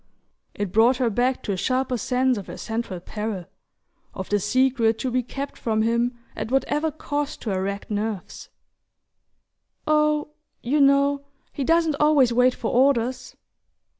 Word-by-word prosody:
It 205 -3 -3
brought 235 +5 +4
her 245 -3 +1
back 250 +4 0
to - - -2
a - - 0
sharper 255 +6 0
sense 255 +2 +1
of 200 -4 -6
her - - -8
central 225 -5 -4
peril: 210 0 -5 0.7
of 190 - -6
the 205 - +2
secret 235 +1 +2
to 255 - -2
be 255 +1 +1
kept 275 +3 -6
from 220 -1 0
him 235 +2 0 0.2
at - - -4
whatever 295 +4 +1
cost 290 -1 -4
to 220 - -2
her 190 -1 -1
racked 200 +2 -4
nerves. 210 -2 -4 1.4
"Oh, 300 -1 +2 0.3
you 285 +5 +2
know, 280 0 +3 0.3
he 280 - -3
doesn't 325 0 +2
always 290 -5 +4
wait 250 +1 +4
for 225 - -3
orders!" 255 -1 +1
250 Hz, 155 wpm, -24 LUFS, 220-275 Hz, 1.4 s, brought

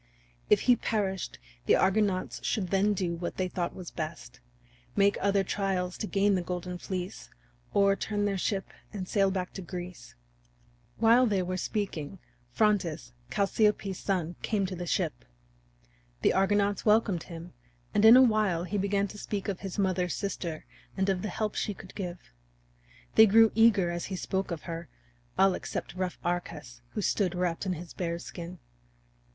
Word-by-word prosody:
If 210 - +5
he 245 - +5
perished 200 -5 -2 0.3
the - - +6
Argonauts 195 -1 +1
should 190 -5 -1
then 200 +2 +3
do 180 -3 -1
what 170 +1 -5
they 185 - 0
thought 175 -1 -3
was 180 -3 -8
best 155 -7 -6 0.6
make 200 0 +4
other 200 0 +3
trials 185 -2 -1
to 215 - -2
gain 200 0 +2
the 185 - +1
Golden 180 0 -4
Fleece, 185 0 -5 0.4
or 200 0 +4
turn 205 0 -1
their 200 -1 0
ship 195 +1 -2 0.2
and 190 -3 -5
sail 195 -2 +3
back 185 -1 -3
to 195 - -6
Greece. 180 0 -8 0.8
While 235 +3 +5
they 195 -4 +1
were 185 +1 -2
speaking, 185 -4 -3 0.3
Phrontis, 170 - +1 0.2
Chalciope's 200 - +1
son, 175 -4 -1
came 205 -3 0
to 185 0 -4
the 175 0 -5
ship. - - -1 1.0
The - - +4
Argonauts 200 +1 +2
welcomed 210 -5 +3
him, 170 -1 -9 0.4
and 205 - +3
in 225 +3 +10
a 260 - +8
while 215 -8 +2
he 200 +3 -2
began 200 +1 +1
to 210 - -9
speak 200 -1 -4
of 195 -3 -2
his 195 0 -6
mother's 185 -3 +1
sister 175 -5 -4 0.3
and 190 +1 +1
of 190 -2 +1
the 215 - -3
help 210 +3 -2
she 205 - -2
could 185 - -12
give. 180 -3 -4 1.0
They 220 0 +8
grew 225 +2 +6
eager 215 -6 +4
as 175 0 -3
he 190 - -4
spoke 190 +1 -2
of 170 -3 -5
her, 165 -3 -6 0.5
all 190 0 +5
except - - -5
rough 185 0 -3
Arcas, 155 -8 -4
who 210 - -2
stood 185 -1 +1
wrapped 180 +1 -1
in 185 - +1
his 170 0 -8
bear's 170 -1 -3
skin. 175 +1 -7
190 Hz, 170 wpm, -29 LUFS, 175-205 Hz, 1.0 s, in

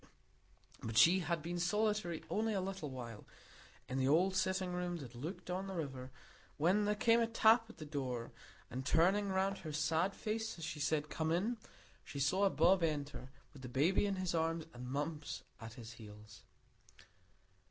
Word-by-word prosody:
But 110 0 -3
she 170 +11 +7
had 170 -2 -1
been 175 +1 -3
solitary 210 -1 0
only 220 0 0
a - - +1
little 190 -5 -4
while 120 -5 -7 0.6
in 130 +1 -2
the 130 - +2
old 180 +6 +4
sitting 185 -1 0
room 180 -1 -2
that 130 -6 -9
looked 160 +9 -6
on 190 +2 -2
the 190 - -5
river, 135 -6 -4 0.5
when 185 +7 +3
there 210 0 +2
came 230 +2 +4
a 230 - +2
tap 225 0 +4
at - - -13
the 155 - -7
door, 130 -5 -3 0.4
and 130 +2 -3
turning 190 +8 +3
round 190 +1 0
her 155 - -6
sad 160 +5 +1
face 220 -1 -3
as 165 - -5
she 160 -1 -5
said 150 +1 0
"Come 160 0 -1
in," 210 +8 +1 0.5
she 140 - -7
saw 190 +8 +3
Bob 190 0 +4
enter, 145 -5 -2 0.2
with 140 - -12
the 125 - -7
baby 160 +11 +3
in 200 - 0
his 185 -2 -2
arms 165 -1 0
and 125 +1 -7
Mumps 145 +2 -3 0.2
at 110 -1 -8
his 115 -2 -9
heels. 105 -2 -12
165 Hz, 180 wpm, -36 LUFS, 140-190 Hz, 0.6 s, she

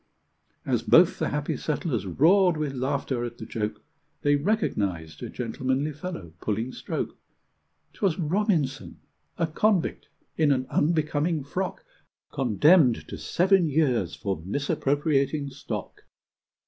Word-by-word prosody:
As - - +1
both - - +5
the - - 0
happy - - -2
settlers - - -2
roared 180 +2 +4
with 150 -3 -2
laughter 130 -1 -1
at 120 -1 -5
the 110 - -7
joke, 105 -1 -4 0.4
They 145 0 +4
recognized 100 - -1
a - - -5
gentlemanly 130 +5 -2
fellow 145 - -7
pulling 110 +4 -2
stroke: - - -4 0.8
'Twas 185 -5 0
Robinson 165 -5 -1 0.4
a 165 - +2
convict, 185 +3 0 0.3
in 155 -2 +4
an 130 -2 +1
unbecoming 155 0 +1
frock! 190 - -4 0.5
Condemned 135 - +4
to - - -6
seven 185 -2 +3
years 130 - +1
for 95 -5 -3
misappropriating 140 - 0
stock!!! 115 -6 -6
145 Hz, 120 wpm, -26 LUFS, 120-165 Hz, 0.8 s, both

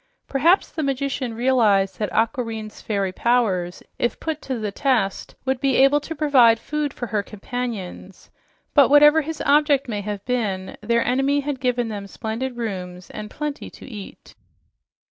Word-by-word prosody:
Perhaps 330 +8 +3
the 315 - -3
magician 270 -3 -2
realized 225 -6 +2
that 210 - -1
Aquareine's 225 -2 -2
fairy 200 -3 -1
powers, 190 -6 0 0.2
if 240 - -1
put 315 -2 -3
to 260 -2 -3
the 215 -2 -3
test, 225 -5 0
would 265 -1 -1
be 275 -1 +2
able 275 +2 +5
to 320 +3 -6
provide 265 -7 +5
food 300 +3 -3
for 245 - -5
her 215 -3 -1
companions, 205 -3 -6 0.4
but 285 -2 +6
whatever 295 +2 +7
his 320 +1 -5
object 290 -1 +3
may 210 -3 -3
have 205 -1 -5
been, 205 -7 -2
their 235 +2 +1
enemy 270 +3 +2
had 280 -2 -4
given 245 -2 0
them 200 -2 -6
splendid 235 +5 -4
rooms 180 -5 -5
and 210 0 -7
plenty 295 +2 -5
to - - -13
eat. 210 -7 -10
245 Hz, 160 wpm, -22 LUFS, 210-275 Hz, 0.4 s, whatever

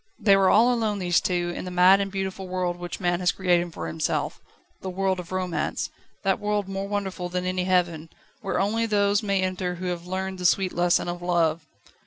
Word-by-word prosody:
They 200 -3 +5
were 195 -1 +4
all 235 +4 +5
alone 220 -3 0
these 175 -2 +2
two 175 -1 -1
in - - -5
the 180 - -5
mad 180 +2 +5
and 195 0 -3
beautiful 190 -1 -4
world, 180 -1 -1
which 175 0 -6
man 175 -2 0
has 180 -1 +2
created 175 -2 +1
for - - -6
himself 160 -1 -2 0.4
the 190 - -4
world 190 0 0
of 180 0 -8
romance 185 -2 -2 0.3
that 195 -1 +1
world 210 -1 -1
more 195 0 -4
wonderful 190 -3 -3
than 180 0 -2
any 185 0 -1
heaven, 175 -3 +1 0.3
where 195 -4 -1
only 225 +4 +1
those 205 -1 +2
may 200 -3 0
enter 185 -1 -2
who 180 +1 -6
have 175 -1 -3
learned 190 0 -3
the 180 - -4
sweet 190 +1 +1
lesson 175 0 +2
of 175 0 -4
love. 165 -3 +1
185 Hz, 210 wpm, -25 LUFS, 175-195 Hz, 0.4 s, They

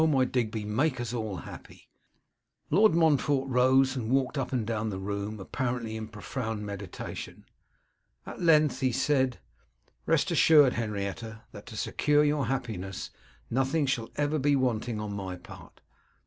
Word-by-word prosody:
my 135 -4 +3
Digby, 115 -4 -2
make 130 +6 0
us 120 -1 -3
all 110 -4 -3
happy.' 85 - -11 0.8
Lord 200 +3 +5
Montfort 145 -4 +3
rose 130 +1 +4
and 115 -4 -3
walked 135 +1 +1
up 135 -3 -2
and 125 -4 0
down 110 -1 -2
the 95 - -4
room, 100 +2 -4
apparently 120 +2 -3
in 110 -1 -5
profound 105 0 -5
meditation. 100 -3 -7 0.8
At - - -8
length 155 -6 +4
he 130 -1 +1
said, 130 0 +1 0.7
'Rest - - +2
assured, 145 -5 +6
Henrietta, 110 0 -4
that 100 - -11
to 110 -3 -8
secure 150 +6 +2
your 145 -4 +1
happiness 110 -8 -4 0.4
nothing 135 +5 +1
shall 120 -4 -1
ever 150 +1 0
be 145 +1 +3
wanting 120 -4 0
on 105 -1 -4
my 95 -2 -4
part. 90 - -14
125 Hz, 150 wpm, -28 LUFS, 110-135 Hz, 0.8 s, assured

